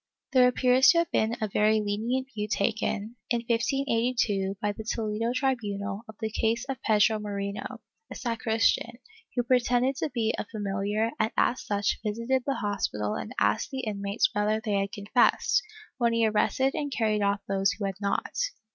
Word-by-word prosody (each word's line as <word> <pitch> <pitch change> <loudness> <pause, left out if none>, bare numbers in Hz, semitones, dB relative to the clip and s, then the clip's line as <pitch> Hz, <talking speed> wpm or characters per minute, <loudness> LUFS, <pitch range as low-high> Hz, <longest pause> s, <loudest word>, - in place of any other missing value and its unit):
^ - - -63 0.3
There 255 -1 +7
appears 250 +1 +4
to 340 - +6
have 335 0 +1
been 220 +2 +1
a 215 - -1
very 215 +2 +3
lenient 225 +6 -1
view 210 -1 -3
taken, 215 +2 -1
in 235 -1 +1
1582, 230 -5 0
by 210 -2 0
the 210 +2 -7
Toledo 220 +1 -1
tribunal, 215 -5 -2
of 220 - -10
the 220 -1 -3
case 230 +3 0
of 270 -1 -5
Pedro 215 0 +3
Moreno, 200 -1 -5 0.3
a - - -8
sacristan, 225 -2 0 0.4
who 245 - +1
pretended 250 +1 +2
to - - -1
be 230 -4 0
a - - -3
familiar 205 +1 -1
and 215 - +2
as 250 - +2
such 205 0 -1
visited 230 +4 -1
the 275 - +1
hospital 195 - -2
and - - -5
asked 105 +1 +1
the 265 -1 -4
inmates 200 -2 -1
whether 210 +1 +1
they 220 -2 -3
had 195 0 -2
confessed, 225 - +2 0.4
when 235 -1 +2
he 230 -1 +3
arrested 220 +5 +1
and 290 -2 -3
carried 215 -4 +1
off 200 0 +1
those 195 0 +1
who 205 - -4
had 195 +1 -4
not. 200 0 -1
220 Hz, 175 wpm, -27 LUFS, 205-245 Hz, 0.4 s, There